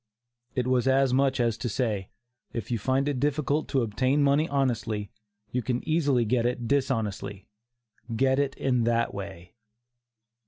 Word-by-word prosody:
It 125 - 0
was 130 0 +2
as 135 -1 +3
much 135 0 +2
as 115 -2 +1
to 125 - -2
say, 105 -4 -1 0.4
"if 115 0 -5
you 115 - 0
find 130 +6 +1
it 140 -3 -1
difficult 145 +1 0
to 135 -4 +1
obtain 130 +6 +1
money 145 +3 +3
honestly, 115 -7 -1 0.4
you 125 - 0
can 125 +3 -2
easily 145 -7 +2
get 120 +2 +1
it 120 -1 -2
dishonestly. 110 -7 -1 0.7
Get 130 +3 +3
it 140 -1 0
in 125 -3 +1
that 115 0 +1
way." 95 -3 -8
125 Hz, 155 wpm, -27 LUFS, 115-135 Hz, 0.7 s, as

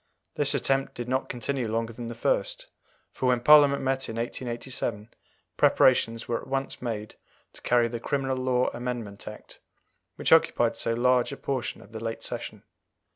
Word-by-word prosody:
This - - +1
attempt 135 0 0
did 120 0 -5
not 130 +1 -1
continue 125 0 -2
longer 115 +1 -2
than 120 +1 -7
the 115 - -6
first, - - -1 0.5
for 130 - -2
when 125 -1 +3
Parliament 140 +1 +6
met 135 0 -1
in 110 - -5
1887, 120 -2 -4 0.5
preparations 115 -3 +3
were 120 - -1
at - - -12
once 135 0 -3
made 110 -3 -4 0.4
to - - -11
carry 120 -1 +3
the 120 0 -5
Criminal 135 +1 -1
Law 130 -1 +1
Amendment 120 -5 -5
Act, - - -10 0.6
which - - -1
occupied - - +4
so 115 - -1
large 125 +1 +2
a 140 - -6
portion 130 -3 -3
of 105 - -18
the 110 0 -7
late 115 0 -4
Session. - - -6
125 Hz, 170 wpm, -27 LUFS, 115-135 Hz, 0.6 s, Parliament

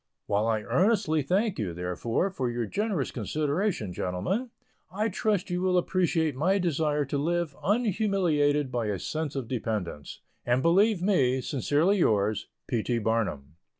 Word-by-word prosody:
While 105 +2 +1
I 110 -2 0
earnestly, 175 - +2
thank 190 - 0
you, 90 -6 -3
therefore, 90 - -1
for 130 -9 -2
your 120 -1 -2
generous 195 - -1
consideration, 145 - -1
gentlemen, 175 - -2 0.4
I 210 +4 0
trust 205 -2 -1
you 180 0 -1
will 185 -1 +2
appreciate 170 -4 +1
my 180 +9 +2
desire 150 -5 0
to 140 +1 -2
live 170 -1 -1
unhumiliated 185 - +1
by 120 -3 -1
a 105 -2 -1
sense 155 - -4
of 135 -4 -3
dependence; 105 - -4 0.2
and 120 +2 +1
believe 190 +3 +3
me, 135 -10 +3
sincerely 150 - +1
yours, 105 - +1 0.2
P. 120 -3 -1
T. 120 +2 -1
BARNUM. 105 -10 -2
150 Hz, 150 wpm, -28 LUFS, 115-185 Hz, 0.4 s, believe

